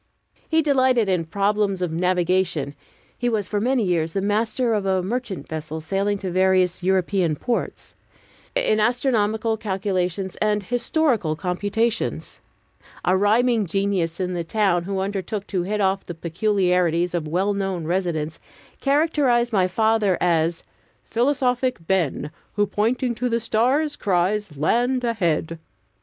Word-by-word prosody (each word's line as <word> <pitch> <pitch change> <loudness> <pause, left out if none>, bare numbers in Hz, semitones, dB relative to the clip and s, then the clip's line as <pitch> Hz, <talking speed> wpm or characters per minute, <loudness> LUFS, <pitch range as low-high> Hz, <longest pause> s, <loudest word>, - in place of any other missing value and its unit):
He 320 0 +3
delighted 260 -6 +3
in 180 -3 +1
problems 200 +2 0
of 180 -3 -1
navigation 175 -3 0 0.4
(he 245 - -1
was 215 -4 -1
for 205 -1 -1
many 250 +1 +2
years 165 -4 0
the 195 - 0
master 225 +4 +1
of 210 -2 0
a 190 -1 +1
merchant 230 0 -4
vessel 155 0 -5
sailing 195 +6 -1
to 190 -2 -4
various 185 0 +2
European 185 -2 +1
ports), 235 - -3 0.6
in 360 - +2
astronomical 220 -2 +1
calculations 190 -3 -2
and 210 -1 +1
historical 240 - 0
computations. 205 +7 -2 0.7
A 185 - +3
rhyming 220 +2 +2
genius 190 -2 -1
in 180 -1 -1
the 175 -1 -2
town, 175 -1 +1
who 195 0 -3
undertook 200 +1 -3
to 185 -3 -2
hit 210 +4 -2
off 195 -1 +1
the 175 - -6
peculiarities 180 -1 +1
of 165 -3 -2
well 190 +6 0
known 195 -4 -2
residents, 165 -3 -2 0.4
characterized 275 -5 +2
my 185 -3 +3
father 220 -1 +2
as 165 -1 +1 0.4
"Philosophic 255 0 +1
Ben, 165 -5 0 0.2
Who, 205 - +2
pointing 235 +5 0
to 245 +2 -2
the 230 0 +1
stars, 255 +7 +1
cries, 190 -2 0
Land 245 - +1
ahead!" 170 -8 -1
200 Hz, 135 wpm, -23 LUFS, 180-230 Hz, 0.7 s, He